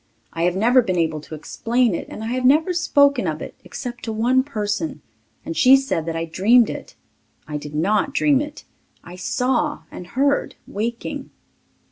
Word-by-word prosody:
I 165 Hz, +1 st, 0 dB
have 175 Hz, 0 st, +1 dB
never 240 Hz, +6 st, +4 dB
been 185 Hz, -6 st, -2 dB
able 160 Hz, -2 st, 0 dB
to 155 Hz, -, -9 dB
explain 230 Hz, +8 st, 0 dB
it -, -, -4 dB
and 215 Hz, -, -7 dB
I 225 Hz, -, -3 dB
have 255 Hz, 0 st, -2 dB
never 310 Hz, +8 st, +4 dB
spoken 285 Hz, -, +3 dB
of 155 Hz, -1 st, -2 dB
it -, -, -7 dB
except 245 Hz, -2 st, -7 dB
to 225 Hz, -, -3 dB
one 240 Hz, +4 st, +2 dB
person 230 Hz, +2 st, -3 dB, 0.4 s
and 330 Hz, -, -4 dB
she 265 Hz, -2 st, +7 dB
said 270 Hz, -12 st, -1 dB
that 165 Hz, -, -2 dB
I 165 Hz, 0 st, -2 dB
dreamed 215 Hz, +9 st, +4 dB
it. -, -, -9 dB, 0.5 s
I 150 Hz, -1 st, -3 dB
did 150 Hz, 0 st, -8 dB
not 200 Hz, -, +1 dB
dream 285 Hz, -1 st, +3 dB
it... 295 Hz, 0 st, -8 dB, 0.4 s
I 175 Hz, -, -10 dB
saw 255 Hz, +10 st, -1 dB
and 180 Hz, -, -9 dB
heard, 280 Hz, +7 st, 0 dB
waking. 230 Hz, +3 st, -4 dB
230 Hz, 180 wpm, -21 LUFS, 175-270 Hz, 0.5 s, she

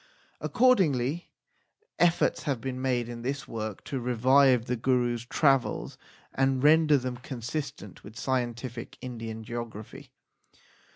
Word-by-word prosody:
Accordingly 175 Hz, -, +2 dB, 0.7 s
efforts 175 Hz, -1 st, +3 dB
have 140 Hz, -6 st, -2 dB
been 130 Hz, +1 st, -4 dB
made 125 Hz, -3 st, 0 dB
in 120 Hz, -1 st, -7 dB
this 135 Hz, +3 st, -3 dB
work 110 Hz, -3 st, -5 dB
to 135 Hz, -, -4 dB
revise 125 Hz, +1 st, +4 dB
the 125 Hz, -, -1 dB
Gurus 120 Hz, -1 st, 0 dB
travels 135 Hz, -4 st, +1 dB, 0.4 s
and 135 Hz, 0 st, +1 dB
render 155 Hz, 0 st, +6 dB
them 125 Hz, -1 st, -4 dB
consistent 130 Hz, -, -6 dB
with 110 Hz, +3 st, -12 dB
scientific 120 Hz, -2 st, -3 dB
Indian 115 Hz, -3 st, -6 dB
geography. 115 Hz, -2 st, -7 dB
125 Hz, 115 wpm, -28 LUFS, 120-140 Hz, 0.7 s, render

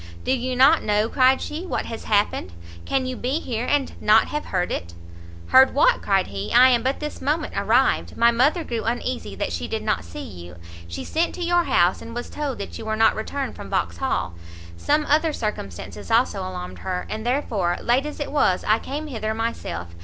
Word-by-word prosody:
"Do -, -, 0 dB
you 255 Hz, 0 st, -1 dB
not 275 Hz, +6 st, +6 dB
know," 210 Hz, +1 st, +1 dB
cried 260 Hz, 0 st, +3 dB
she, 310 Hz, +4 st, -5 dB
"what 370 Hz, -, -3 dB
has 225 Hz, -, -7 dB
happened? 205 Hz, -, 0 dB, 0.3 s
Can 270 Hz, -1 st, 0 dB
you 255 Hz, 0 st, -3 dB
be 260 Hz, +6 st, -1 dB
here 240 Hz, -5 st, -3 dB
and 290 Hz, -2 st, +1 dB
not 215 Hz, +1 st, +5 dB
have 300 Hz, 0 st, -3 dB
heard 180 Hz, -2 st, -1 dB
it?" 85 Hz, 0 st, -4 dB, 0.5 s
"Heard 265 Hz, 0 st, +6 dB
what?" -, -, +4 dB
cried 195 Hz, -2 st, +2 dB
he, 100 Hz, +1 st, -5 dB
"I 255 Hz, +1 st, +7 dB
am 240 Hz, -2 st, +3 dB
but 260 Hz, +3 st, -1 dB
this 300 Hz, 0 st, -6 dB
moment 305 Hz, +2 st, -1 dB
arrived; -, -, +2 dB
my 235 Hz, 0 st, +5 dB
mother 280 Hz, +9 st, +2 dB
grew 235 Hz, -6 st, -3 dB
uneasy 240 Hz, -, -3 dB
that 90 Hz, -, -3 dB
she 85 Hz, -1 st, -3 dB
did -, -, -3 dB
not 85 Hz, -, 0 dB
see 85 Hz, 0 st, -8 dB
you, 90 Hz, -2 st, -10 dB, 0.3 s
she 85 Hz, -, -6 dB
sent 330 Hz, +2 st, -1 dB
to 355 Hz, -, -4 dB
your 350 Hz, 0 st, +2 dB
house, 175 Hz, +2 st, +2 dB
and 230 Hz, 0 st, -9 dB
was 240 Hz, -, -5 dB
told 290 Hz, -4 st, -3 dB
that 200 Hz, -, -7 dB
you 225 Hz, -, -7 dB
were 220 Hz, 0 st, -1 dB
not 225 Hz, +1 st, +4 dB
returned 270 Hz, +5 st, -4 dB
from -, -, -9 dB
Vauxhall; 260 Hz, -, -1 dB, 0.4 s
some 295 Hz, -, +1 dB
other 310 Hz, +2 st, +2 dB
circumstances 210 Hz, -, -5 dB
also 230 Hz, -3 st, +2 dB
alarmed 185 Hz, -1 st, -6 dB
her, 180 Hz, -1 st, -3 dB
and 220 Hz, 0 st, -5 dB
therefore, 220 Hz, -9 st, 0 dB
late 255 Hz, +5 st, +1 dB
as 300 Hz, -, -7 dB
it 290 Hz, -, -4 dB
was, 190 Hz, -11 st, +2 dB
I 215 Hz, +1 st, +4 dB
came 295 Hz, +3 st, -5 dB
hither 220 Hz, -6 st, -3 dB
myself. 225 Hz, -, -4 dB
235 Hz, 205 wpm, -23 LUFS, 195-280 Hz, 0.5 s, I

